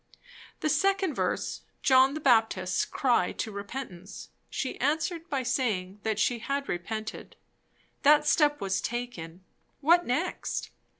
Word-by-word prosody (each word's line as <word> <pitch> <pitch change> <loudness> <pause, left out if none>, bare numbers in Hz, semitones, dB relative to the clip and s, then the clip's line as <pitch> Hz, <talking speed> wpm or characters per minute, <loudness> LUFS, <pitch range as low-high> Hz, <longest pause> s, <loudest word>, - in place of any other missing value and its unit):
The 310 - +1
second 385 +2 +2
verse, - - -2 0.2
John 265 +1 +5
the - - -3
Baptist's 220 -9 +2
cry 240 -9 +1
to 220 - -4
repentance, 200 -2 -7 0.2
she 260 - -4
answered 320 +4 -1
by 270 -2 -1
saying 210 -7 -1
that 220 -1 -1
she 235 +2 +1
had 275 +4 -2
repented; 215 +5 -5 0.7
that 300 +1 +6
step 295 -1 +3
was 195 -1 -1
taken; 190 -8 -5 0.4
what 340 +4 +5
next? 300 +9 -2
255 Hz, 125 wpm, -28 LUFS, 205-295 Hz, 0.7 s, that